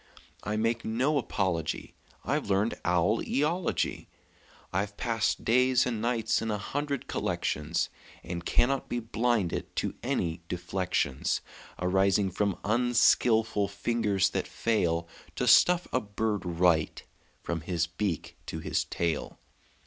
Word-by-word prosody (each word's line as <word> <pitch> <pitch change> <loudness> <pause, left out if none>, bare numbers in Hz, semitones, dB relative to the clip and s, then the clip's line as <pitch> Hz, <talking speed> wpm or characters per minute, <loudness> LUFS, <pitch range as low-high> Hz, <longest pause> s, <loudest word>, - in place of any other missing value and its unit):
I 105 - -2
make 115 +1 0
no 130 +7 +1
apology; 95 - -2 0.3
I've - - -1
learned 100 +3 +2
owl 90 +5 +2
eology. 165 +6 -1 0.7
I've 100 +2 -1
passed 115 -3 0
days 125 +2 +4
and 115 -4 -2
nights 115 -1 +1
in 115 - -2
a 105 - 0
hundred 140 +6 -3
collections, 75 +3 -1 0.3
And 85 -1 -5
cannot 135 +9 +1
be 120 - -1
blinded 115 -5 -1
to - - -1
any 85 0 -1
deflections 90 -6 -1 0.4
Arising 95 +2 +2
from 100 0 0
unskilful 115 -2 +3
fingers 100 -1 +1
that 95 - -2
fail 85 -7 0 0.3
To - - -1
stuff 180 0 +6
a 130 - +2
bird 105 -1 -2
right, 85 -2 +2 0.4
from 85 -1 -2
his 85 0 0
beak 85 -1 -3
to - - -4
his 80 - -1
tail. 85 -3 -2
105 Hz, 125 wpm, -29 LUFS, 90-115 Hz, 0.7 s, stuff